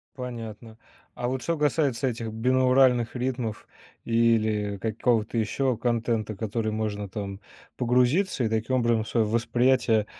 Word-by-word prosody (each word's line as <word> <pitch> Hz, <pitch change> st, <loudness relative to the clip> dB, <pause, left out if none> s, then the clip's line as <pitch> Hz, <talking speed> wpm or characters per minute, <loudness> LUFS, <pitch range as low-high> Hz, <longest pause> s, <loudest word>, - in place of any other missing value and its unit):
Понятно, 115 Hz, -3 st, -7 dB, 0.4 s
а 120 Hz, -, -3 dB
вот 130 Hz, 0 st, -2 dB
что 170 Hz, +4 st, -1 dB
касается 145 Hz, -4 st, +1 dB
этих 115 Hz, -2 st, -4 dB
бинауральных 125 Hz, +1 st, +3 dB
ритмов 125 Hz, -4 st, -3 dB, 0.4 s
или 110 Hz, -3 st, +1 dB
какого-то 110 Hz, +2 st, 0 dB
еще 125 Hz, +3 st, 0 dB
контента, 115 Hz, -2 st, -1 dB
который 110 Hz, +1 st, -2 dB
можно, 105 Hz, -2 st, -3 dB
там, 100 Hz, 0 st, -6 dB, 0.4 s
погрузиться 125 Hz, +6 st, +2 dB
и, -, -, +1 dB
таким 110 Hz, +4 st, 0 dB
образом, 115 Hz, -3 st, +2 dB
свое 115 Hz, -2 st, +1 dB
восприятие 115 Hz, 0 st, +2 dB
115 Hz, 125 wpm, -26 LUFS, 110-125 Hz, 0.4 s, бинауральных